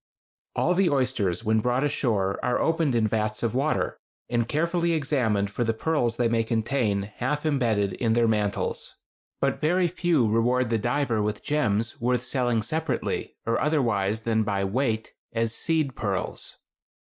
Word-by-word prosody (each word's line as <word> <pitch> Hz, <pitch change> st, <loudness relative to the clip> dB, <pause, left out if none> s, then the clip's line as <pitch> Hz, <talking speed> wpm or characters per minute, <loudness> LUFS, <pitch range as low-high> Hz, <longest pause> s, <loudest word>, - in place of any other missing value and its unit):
All 180 Hz, -, +2 dB
the 185 Hz, 0 st, +3 dB
oysters 125 Hz, -, 0 dB
when 110 Hz, 0 st, +2 dB
brought 125 Hz, +4 st, +1 dB
ashore 110 Hz, -9 st, 0 dB
are 125 Hz, -, +1 dB
opened 160 Hz, -5 st, +1 dB
in 110 Hz, -2 st, +3 dB
vats 110 Hz, 0 st, -1 dB
of 115 Hz, -, 0 dB
water, 140 Hz, +4 st, 0 dB, 0.3 s
and 120 Hz, -1 st, 0 dB
carefully 170 Hz, +4 st, +1 dB
examined 125 Hz, -10 st, 0 dB
for 120 Hz, -, -1 dB
the 115 Hz, -1 st, 0 dB
pearls 120 Hz, -4 st, 0 dB
they 120 Hz, -, +2 dB
may 115 Hz, 0 st, +1 dB
contain 110 Hz, -2 st, 0 dB
half 130 Hz, +9 st, -3 dB
embedded 115 Hz, -10 st, +1 dB
in 115 Hz, -2 st, 0 dB
their 115 Hz, 0 st, +3 dB
mantles; 105 Hz, -2 st, -1 dB, 0.5 s
but -, -, 0 dB
very 175 Hz, +3 st, +3 dB
few 170 Hz, -8 st, +1 dB
reward 115 Hz, +2 st, +2 dB
the 115 Hz, -, +2 dB
diver 120 Hz, -1 st, 0 dB
with 105 Hz, 0 st, -2 dB
gems 115 Hz, -7 st, 0 dB
worth 125 Hz, 0 st, +1 dB
selling 120 Hz, -3 st, 0 dB
separately 160 Hz, +4 st, -2 dB
or 115 Hz, 0 st, 0 dB
otherwise 115 Hz, -9 st, +1 dB
than 110 Hz, -1 st, +1 dB
by 100 Hz, -2 st, 0 dB
weight 110 Hz, +2 st, -1 dB, 0.2 s
as 115 Hz, 0 st, 0 dB
"seed" 155 Hz, -1 st, 0 dB
pearls. 100 Hz, -4 st, -3 dB
120 Hz, 155 wpm, -26 LUFS, 110-140 Hz, 0.5 s, the